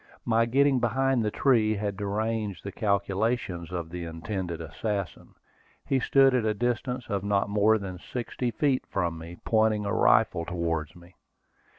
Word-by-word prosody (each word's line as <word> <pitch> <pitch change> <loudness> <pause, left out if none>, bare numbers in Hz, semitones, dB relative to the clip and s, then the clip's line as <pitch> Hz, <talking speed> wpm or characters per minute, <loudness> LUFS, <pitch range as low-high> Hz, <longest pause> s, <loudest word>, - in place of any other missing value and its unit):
My 115 0 +3
getting 135 +2 +3
behind 130 +2 +1
the 105 - +1
tree 110 -2 +2
had 100 -1 -2
deranged 105 -1 -2
the 100 - -5
calculations 100 -3 -1
of 85 -2 -4
the 90 -1 -5
intended 85 +1 -4
assassin. 100 +1 -4 0.5
He 135 - +1
stood 135 +1 +4
at 125 -3 +2
a 110 -1 0
distance 125 +2 -2
of 100 -3 -2
not 100 0 +1
more 105 +2 +4
than 95 -3 -6
sixty 120 +3 -4
feet 135 +1 +1
from 85 -3 -2
me, 85 +2 -9
pointing 110 -2 +2
a 100 - -1
rifle 110 -9 +3
towards 85 -3 -2
me. 85 +1 -16
105 Hz, 160 wpm, -27 LUFS, 90-120 Hz, 0.5 s, stood